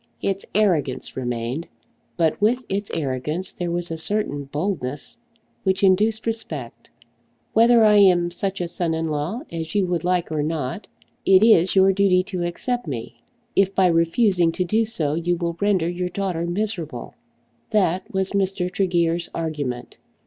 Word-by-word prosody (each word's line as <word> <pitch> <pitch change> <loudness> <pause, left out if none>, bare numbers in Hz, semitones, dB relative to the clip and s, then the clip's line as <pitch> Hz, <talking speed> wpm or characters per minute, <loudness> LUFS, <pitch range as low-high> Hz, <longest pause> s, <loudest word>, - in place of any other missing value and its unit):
Its 195 0 -2
arrogance 170 -11 +1
remained, 125 +4 -3 0.5
but 165 +1 +1
with 240 +5 +2
its 200 +1 -3
arrogance 150 +4 -3
there 175 -1 -3
was 175 0 -2
a 160 - -3
certain 160 -7 -1
boldness 145 - -4 0.4
which 190 0 0
induced 210 +3 +3
respect. 160 - -5 0.6
Whether 230 +1 +6
I 210 -1 +6
am 180 -3 +5
such 195 +1 -3
a 175 - -1
son 170 -1 -1
in 160 0 -2
law 155 - -2
as 165 +2 -5
you 200 -2 +3
would 175 -2 -2
like 180 -2 0
or 155 -1 0
not, 150 +2 -3 0.4
it 190 +1 +5
is 190 -5 +5
your 190 0 +5
duty 190 -2 +3
to 185 -2 -5
accept 240 +6 -3
me, 120 -6 -6 0.3
if 195 0 +2
by 190 - +4
refusing 170 +1 +3
to 180 - -1
do 220 +5 +1
so 160 -10 +1
you 170 +2 0
will 170 -1 -2
render 195 -5 +2
your 180 +1 -2
daughter 180 -3 -2
miserable. 175 - -4 0.6
That 185 -3 +1
was 190 -1 -1
Mr. 190 -2 -1
Tregear's 175 -3 0
argument. 145 -7 -4
175 Hz, 155 wpm, -22 LUFS, 160-195 Hz, 0.6 s, Whether